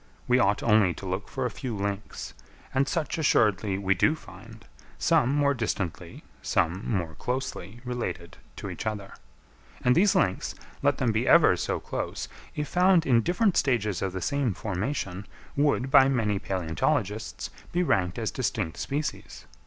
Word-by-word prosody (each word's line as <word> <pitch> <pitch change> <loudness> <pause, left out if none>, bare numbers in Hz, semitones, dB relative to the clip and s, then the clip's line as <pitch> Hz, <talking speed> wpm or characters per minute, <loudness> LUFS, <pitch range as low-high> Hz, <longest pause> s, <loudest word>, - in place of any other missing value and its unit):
We 125 +1 +4
ought 100 -2 +2
only 105 -6 +4
to - - -9
look 95 +2 -3
for 130 -2 -2
a 125 - -1
few 120 0 -5
links, 100 +1 -4 0.4
and 135 +1 +2
such 165 -1 -1
assuredly 105 -9 +2
we 95 -1 +2
do 125 - +3
find—some 115 - -2
more 140 0 +3
distantly, 110 - -4 0.2
some 90 +5 0
more 85 -7 -1
closely, 120 -1 -4
related 120 -8 -4 0.2
to - - -6
each - - -5
other; 105 -3 -4 0.7
and 125 - +5
these 195 +7 +4
links, 95 - +1 0.3
let - - +2
them 120 - +1
be 110 +3 0
ever 165 - +6
so - - -2
close, - - -4 0.3
if 150 -1 -2
found 180 -2 +4
in 120 -3 +4
different 185 - +2
stages 110 - +1
of 95 - -1
the 95 0 -5
same 140 -6 0
formation, 100 -1 -3 0.3
would, 140 -2 +1
by 135 0 +7
many 110 -6 +1
palæontologists, 95 - -2 0.2
be 175 +1 +1
ranked 90 - +1
as 115 -2 -1
distinct 105 -9 -2
species. 140 - -4
110 Hz, 155 wpm, -27 LUFS, 95-135 Hz, 0.7 s, by